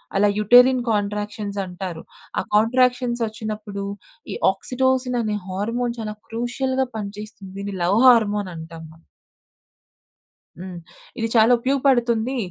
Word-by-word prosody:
అలా 205 +1 +4
uterine 245 +4 +6
contractions 205 0 -2
అంటారు. 180 -2 -6 0.4
ఆ - - +1
కాంట్రాక్షన్స్ 245 +2 +2
ఒచ్చినప్పుడు 215 -2 -6 0.5
ఈ - - -3 0.2
ఆక్సిటోసిన్ 255 +4 0
అనే 215 -2 -1
హార్మోన్ 230 +5 -2
చాలా 215 -1 -4
క్రూషియల్‌గా 260 +3 -1
పనిచేస్తుంది. 205 -1 -8
దీన్ని 200 -1 -5
లవ్ 195 +5 +3
హార్మోన్ 210 -5 +4
అంటాం 165 0 -9
మనం. 165 +1 -20 1.5
హ్మ్. 180 0 -8 0.4
ఇది 225 - 0
చాలా 225 +1 +6
ఉపయోగపడుతుంది. 255 -2 +1
220 Hz, 110 wpm, -22 LUFS, 200-245 Hz, 1.5 s, uterine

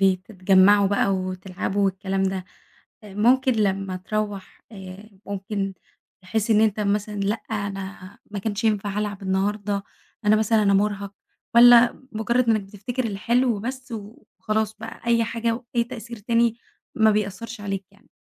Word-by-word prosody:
بي 190 -1 +4
بتتجمعوا 195 +1 +4
بقى 200 0 +2
وتلعبوا 185 +1 -2
والكلام 195 0 -1
ده، 190 -1 -1 0.6
آآ 205 - -11
ممكن 255 +5 +4
لمّا 195 -3 0
تروَّح 205 +1 -4
آآ 190 +1 -10 0.2
ممكن 200 0 -3 0.5
تحس 215 +4 -1
إن 215 0 +5
أنتَ 215 -1 +2
مثلًا 210 +1 0
لأ، 200 +2 0 0.2
أنا 195 -2 -5
ما 205 - -3
كانش 210 +1 -3
ينفع 205 -2 0
العب 205 -2 -3
النهارده، 200 +1 -1 0.4
أنا 210 +1 +5
مثلًا 220 0 +2
أنا 200 -1 +3
مُرهَق، 200 0 0 0.4
والّا 240 +1 +7
مجرّد 235 +2 +1
إنّك 215 -2 +3
بتفتكر 210 +6 -5
الحلو 230 +2 +1
بس 255 +2 -6
وخلاص 215 0 -4
بقى 225 +1 -9
أي 230 -1 +4
حاجة 230 0 -1
وأي 235 0 -2
تأثير 235 -1 -8
تاني، 230 +2 +1 0.4
ما 220 -1 +5
بيأثرش 210 +2 -3
عليك 195 -1 -4
يعني؟ 200 - -25
205 Hz, 145 wpm, -24 LUFS, 195-225 Hz, 0.6 s, والّا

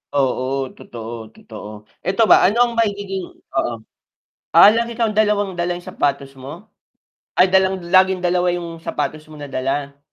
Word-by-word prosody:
Oo, 130 -2 +1 0.3
totoo, 115 0 -9 0.2
totoo, 105 -2 -11 0.4
eto 195 +4 +1
ba, - - +9
ano 205 +5 +2
ang 235 - -6
magiging 200 -3 -1 0.3
oo, 120 -3 0 0.8
ah, 205 - +9
lagi 235 0 -1
kang 225 -2 0
dalawang 205 -3 +1
dala 175 0 -1
yung 175 - -8
sapatos 140 -1 -2
mo? 130 +1 -9 0.9
Ay 185 +1 +5
dalang 190 0 +2
laging 185 -1 +4
dalawa 180 0 +1
yung 170 -1 -6
sapatos 155 +1 -3
mo 155 - -14
na 145 -1 -8
dala? 140 +2 -3
175 Hz, 155 wpm, -20 LUFS, 140-195 Hz, 0.9 s, ba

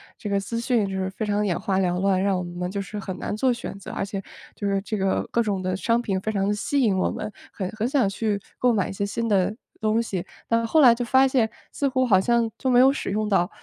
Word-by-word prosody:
这 210 - -6
个 200 0 +1
资 230 +4 -4
讯 235 -3 +1
就 195 - -5
是 190 0 -1
非 215 +3 -4
常 205 0 0
眼 190 -4 0
花 195 -1 0
缭 180 -1 +1
乱， 190 -1 +2
让 195 -1 +2
我 180 - -2
们 175 +1 -4
就 200 +1 -3
是 210 +2 -6
很 190 -1 -5
难 - - -3
做 255 +3 +2
选 235 -4 -5
择， - - -8
而 195 - -2
且 195 -1 -4 0.3
就 205 - -3
是 195 0 +1
这 215 +1 -3
个 195 -1 0
各 235 - +2
种 200 -4 -1
的 185 0 -1
商 230 +4 +1
品 195 -5 -2
非 215 - -2
常 200 0 0
吸 275 +7 -1
引 210 -6 +3
我 185 - +1
们， 210 - -5 0.2
很 190 - -4
很 220 +2 -2
想 265 -8 +2
去 205 0 -1 0.2
购 250 -1 +4
买 200 -4 0
一 - - -5
些 200 - -3
新 230 +3 -2
的 200 +1 +2 0.3
东 220 +1 +2
西， 190 -5 -3 0.2
但 230 0 +1
后 315 +4 +4
来 245 -3 +8
就 245 +1 -3
发 265 +2 +5
现 245 -4 +2 0.2
似 280 - 0
乎 260 -1 +1
好 190 -6 +5
像 235 0 +2
就 260 - 0
没 245 0 +5
有 265 +1 +7
使 - - -4
用 215 +2 0
到。 180 -3 +2
205 Hz, 295 characters per minute, -24 LUFS, 195-230 Hz, 0.3 s, 来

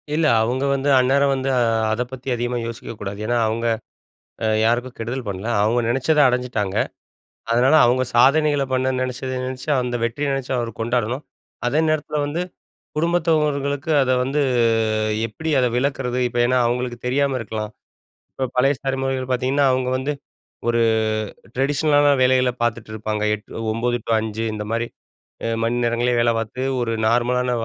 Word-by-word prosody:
இல்ல. 160 +1 +2 0.2
அவங்க 125 +4 0
வந்து 140 +1 0
அந்நேரம் 140 +2 +3
வந்து 135 0 -2 0.4
அத 110 +3 -1
பத்தி 130 0 -9
அதிகமா 120 +1 -2
யோசிக்கக்கூடாது. 110 -4 -7
ஏனா, 120 +1 +1
அவங்க 115 +2 -2 0.8
அ - - +2 0.2
யாருக்கும் 120 +2 0
கெடுதல் 120 +3 -4
பண்ணல, 100 +3 -4
அவங்க 115 +3 +2
நெனைச்சத 135 +6 +2
அடைஞ்சிட்டாங்க. 125 -6 -1 0.8
அதனால, 125 +5 +4
அவங்க 125 +2 +2
சாதனைகள 145 +3 +4
பண்ண 130 0 +1
நெனைச்சத 130 0 -3
நெனச்சு 130 +3 -5
அந்த 125 0 -2
வெற்றிய 130 +5 -1
நெனைச்சு 135 -2 -3
அவரு 120 -1 -2
கொண்டாடணும். 120 +3 -1 0.4
அதே 145 +5 +1
நேரத்தில 150 -1 -1
வந்து 150 +4 -2 0.6
குடும்பத்தவர்களுக்கு 155 -3 +1
அத 130 -1 +1
வந்து 140 +3 0 0.9
எப்படி 160 +9 -5
அதை 125 - +3
விளக்குறது. 125 -1 -1
இப்ப 120 0 -4
ஏனா, 125 +1 +2
அவங்களுக்கு 120 0 -2
தெரியாம 135 +1 +1
இருக்கலாம். 110 -1 -4 0.6
இப்ப 130 - -2
பழைய 135 +3 +4
ஸ்தலைமுறைகள் 135 -1 -2
பார்த்தீங்கன்னா, 130 +3 +1
அவங்க 130 0 0
வந்து 135 +3 -2 0.6
ஒரு 115 0 +2 0.7
டிரெடிஷ்னலான 145 +2 +3
வேலைகள 130 0 +4
பார்த்துட்டு 115 -2 -2
இருப்பாங்க. 110 0 -3
8, 105 +2 -8
9 120 +2 0
டூ 115 - 0
5 110 0 -3
இந்த 105 0 -4
மாரி 115 +1 0 0.8
மணி 115 +1 0
நேரங்கள்லயே 120 +1 +1
வேலை 120 0 +3
பார்த்து 115 +3 -5 0.2
ஒரு 115 -1 -1
நார்மலான 125 +2 +1
125 Hz, 145 wpm, -21 LUFS, 120-135 Hz, 0.9 s, அதனால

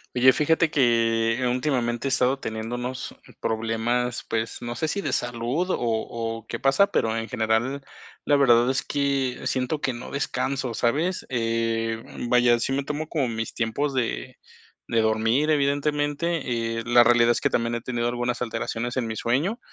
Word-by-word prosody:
Oye, 130 +1 +7
fíjate 160 +2 +2
que 115 -2 +2
últimamente 125 -1 -1
he - - +1
estado 130 +1 +2
teniendo 110 0 -4
unos 125 +1 -5 0.3
problemas, 115 +2 -1
pues, 115 0 -2
no 120 0 -4
sé, 160 - -1
si 200 +6 -2
de - - -2
salud, 120 +9 -1
o - - +1
o 115 -1 -2
qué - - -5
pasa, 135 +9 +4
pero 115 - 0
en 115 0 -3
general, 115 +6 0 0.4
la 145 - +3
verdad 120 -3 +5
es 130 - 0
que 140 -3 -1
siento 130 +4 -1
que 130 - 0
no 120 +1 -8
descanso, 135 -2 -2
¿sabes?, 150 +11 0
eh, 115 -1 -1 0.3
vaya, 120 -1 +5
sí 120 - -1
me 140 +1 0
tomo 150 +2 -3
como 145 -6 0
mis 115 -1 -4
tiempos 130 +5 -1
de 125 -3 -2 0.5
de 115 - +2
dormir, 110 +7 +2
evidentemente, 145 -4 0
eh, - - -4
la 120 0 +6
realidad 120 0 +5
es 120 - 0
que - - +2
también, 115 0 0
he 120 - -3
tenido 120 -1 -2
algunas 120 0 -2
alteraciones 115 +1 -3
en 130 -3 0
mi 110 -1 -4
sueño, 150 - 0
120 Hz, 170 wpm, -25 LUFS, 115-140 Hz, 0.5 s, Oye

